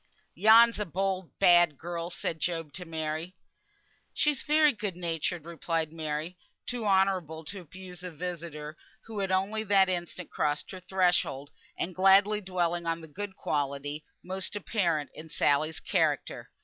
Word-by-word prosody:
"Yon's 225 +5 +6
a 210 - 0
bold, 190 +1 -1
bad 175 -5 +5
girl," 170 +1 -4
said 165 -2 -3
Job 165 -3 -2
to 180 - -5
Mary. 160 +2 -4 0.8
"She's 295 -3 +2
very 300 0 +4
good 205 -5 -4
natured," 170 -1 -2
replied 165 -1 -2
Mary, 160 +2 -4 0.3
too 240 -3 -3
honourable 185 -5 +1
to 195 +6 -6
abuse 180 +1 -10
a 180 - -4
visitor 160 -2 -6 0.3
who 220 -2 -6
had 195 -1 -1
only 200 +4 0
that 195 -2 +4
instant 175 -1 -4
crossed 150 0 -1
her 185 - -7
threshold, 175 -7 +1 0.3
and 180 - -3
gladly 195 +3 +5
dwelling 175 -3 -1
on 165 0 -1
the 160 - -10
good 190 +5 -6
quality 145 0 -2 0.2
most 190 +2 -3
apparent 170 - 0
in 160 +1 -10
Sally's 155 +2 +1
character. - - 0
175 Hz, 150 wpm, -29 LUFS, 160-195 Hz, 0.8 s, Yon's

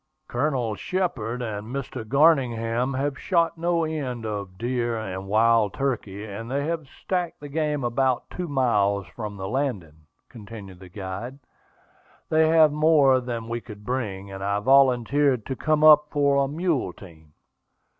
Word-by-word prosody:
"Colonel 125 -3 -1
Shepard 125 - -2
and 105 -2 -5
Mr. 130 -2 -5
Garningham 125 -2 +2
have 135 +1 -2
shot 170 -3 +1
no 170 0 0
end 135 -7 -3
of 100 -3 -5
deer 120 0 -1
and 95 -3 -5
wild 110 0 +3
turkey, 110 -7 -3
and 110 +2 -7
they 140 +2 -1
have 160 -2 -3
stacked 180 +1 -3
the 145 - -8
game 150 -1 -1
about 125 +1 0
two 180 -1 -4
miles 105 - +1
from 105 +2 -7
the 95 0 -5
landing," 95 - -3 0.2
continued 105 -5 -11
the 95 -1 -13
guide. 100 +7 -6 0.9
"They 160 0 +4
have 160 -1 +5
more 150 -3 +4
than 120 -2 -5
we 120 0 -3
could 105 -3 -12
bring, 100 -6 -3
and 95 0 -7
I 100 +1 0
volunteered 130 +1 +3
to 130 - -4
come 155 +2 +1
up 150 -1 +8
for 140 -1 +2
a - - -1
mule 150 - -1
team." 80 -5 -16
125 Hz, 155 wpm, -25 LUFS, 105-145 Hz, 0.9 s, up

